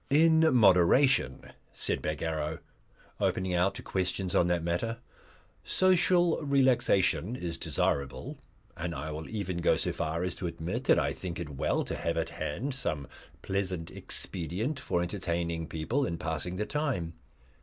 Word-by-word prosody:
"In 160 +2 +5
moderation," 100 - +4 0.2
said - - -1
Bagarrow, 80 0 -2 0.6
opening 95 0 0
out 90 +2 +2
to - - -6
questions 95 0 -1
on 85 - +4
that 85 -1 +1
matter, 90 +7 -1 0.7
"social 180 -2 +3
relaxation 125 - +2
is 85 -8 -4
desirable, 70 -2 -1 0.4
and 85 0 -4
I 75 +3 -4
will 80 +1 -6
even 95 -5 -3
go 85 - +3
so - - -1
far 80 +3 -2
as 90 -1 -1
to 90 - -3
admit 85 +9 -4
that - - +5
I - - +1
think 85 -3 -6
it 85 -3 -4
well 70 - 0
to - - -4
have - - -2
at - - -1
hand 125 - -3
some 85 - -2 0.4
pleasant 95 -4 -2
expedient 95 - -3
for 85 -2 0
entertaining 85 -1 -2
people 115 - -1
and 85 - -4
passing 85 +1 -3
the 105 +3 -1
time. 130 - -2
90 Hz, 150 wpm, -30 LUFS, 80-125 Hz, 0.7 s, In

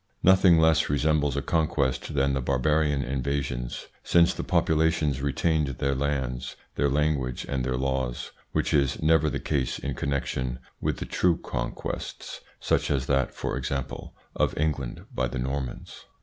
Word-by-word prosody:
Nothing 95 -2 +6
less 80 -1 +4
resembles 75 -1 +1
a 70 - -1
conquest 75 -4 0
than 70 0 +2
the 70 - 0
bar 70 +1 0
barian 75 0 +2
invasions, 65 -2 -2 0.2
since 85 0 +4
the - - -4
populations 80 -3 +2
retained 75 +2 +1
their 70 +1 +1
lands, 65 -2 -2 0.2
their 70 - +1
language, 70 -3 0
and 65 -2 -1
their 65 0 -1
laws, 65 -2 -2 0.2
which - - 0
is 70 -3 +2
never 80 -1 +4
the - - -2
case 65 -3 -1
in 70 - -4
connection 65 -2 -2 0.2
with - - -2
true 90 -2 +2
conquests, - - -5 0.2
such - - +1
as 70 -3 +1
that, 65 -2 +1
for - - -3
example, 65 -2 -4 0.2
of - - +1
England 70 -5 -2
by 65 0 0
the 65 +2 -5
Normans. 65 +1 -4
70 Hz, 150 wpm, -27 LUFS, 65-75 Hz, 0.2 s, Nothing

